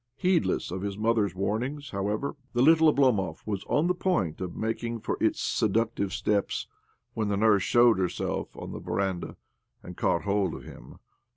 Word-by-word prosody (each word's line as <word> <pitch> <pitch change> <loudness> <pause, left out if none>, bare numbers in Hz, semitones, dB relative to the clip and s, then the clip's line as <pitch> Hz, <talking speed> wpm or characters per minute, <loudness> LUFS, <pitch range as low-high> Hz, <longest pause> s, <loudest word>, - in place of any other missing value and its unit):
Heedless 180 - +1
of 95 +1 -4
his 100 0 -4
mother's 105 -4 +1
warnings, 125 +9 -2
however, 105 +7 -2 0.2
the 120 +1 +3
little 160 +2 +6
Oblomov 125 -10 +1
was 100 -2 -3
on 150 - +1
the 180 - +2
point 175 - -1
of 90 -2 -4
making 115 +1 -3
for - - -2
its - - +2
seductive 110 -2 0
steps 100 0 -1 0.5
when 110 -2 -1
the 100 -1 0
nurse 105 -1 +4
showed 120 +1 +4
herself 90 -2 -2
on - - -7
the - - -6
veranda, 95 -3 -2 0.5
and - - -9
caught 85 - +1
hold 100 -3 0
of - - -9
him. - - -12
105 Hz, 170 wpm, -27 LUFS, 100-120 Hz, 0.5 s, little